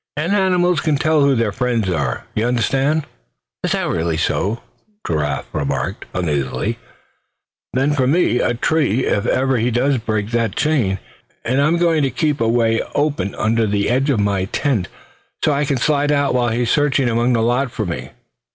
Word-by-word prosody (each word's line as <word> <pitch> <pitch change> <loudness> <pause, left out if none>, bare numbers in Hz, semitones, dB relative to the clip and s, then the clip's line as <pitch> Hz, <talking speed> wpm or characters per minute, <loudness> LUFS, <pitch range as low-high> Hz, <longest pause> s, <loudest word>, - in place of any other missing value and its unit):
And 170 +6 0
animals 180 -4 +2
can 155 0 +1
tell 155 +1 +2
who 140 -1 +4
their 115 -3 +1
friends 120 -1 -1
are, 70 -9 -2
you 110 - -1
understand." 135 +5 +1 0.6
"Is - - 0
that - - -1
really 80 -1 -1
so?" 100 +7 -1 0.4
Giraffe 75 -3 -1
remarked, 70 +5 -2
uneasily; 75 -7 -1 0.9
"then 135 +3 +1 0.2
me 160 -7 +2
for - - +1
a 120 - 0
tree 130 -2 +1
if 100 +4 0
ever 130 0 +1
he 120 +2 +1
does 125 +3 +1
break 110 -1 -2
that 115 -3 0
chain. 125 -11 +1 0.5
And 130 +4 +1
I'm 155 +4 +2
going 170 -2 +2
to 135 - +1
keep 150 +1 -1
a 115 - +2
way 115 -1 +2
open 145 -10 0
under 110 0 +1
the 100 +1 0
edge 135 +4 +1
of 110 -7 +2
the 100 -1 -1
tent, 120 - 0 0.6
so 155 - +3
I 145 +1 0
can 140 -2 0
slide 145 +3 +1
out 140 -1 +1
while 120 -1 +1
he's 120 +1 0
searching 140 -3 +2
among 120 +1 +1
the 115 -1 +1
lot 125 +3 +1
for 110 -2 -4
me. 65 -7 -5
120 Hz, 180 wpm, -19 LUFS, 105-145 Hz, 0.9 s, who